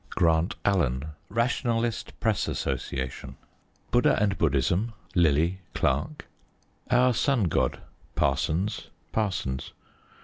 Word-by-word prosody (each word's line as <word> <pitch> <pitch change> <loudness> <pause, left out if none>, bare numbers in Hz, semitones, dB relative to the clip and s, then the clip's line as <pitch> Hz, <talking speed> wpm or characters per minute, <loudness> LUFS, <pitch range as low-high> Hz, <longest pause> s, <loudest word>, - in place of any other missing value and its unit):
_ - - -32
Grant 85 +5 +2
Allen. 75 -7 +1 0.2
Rationalist 115 0 -1
Press 110 -3 +1
Association. 65 -1 -3 0.6
Buddha 120 - +4
and 100 -2 +2
Buddhism. 85 - +1 0.2
Lillie. 85 +1 +3 0.2
Clark. 75 - 0 0.6
Our 125 0 +4
Sun 125 0 +2
God. - - 0 0.3
Parsons. 90 +7 0 0.2
Parsons. 90 -12 -2
95 Hz, 95 wpm, -27 LUFS, 80-115 Hz, 0.6 s, Buddha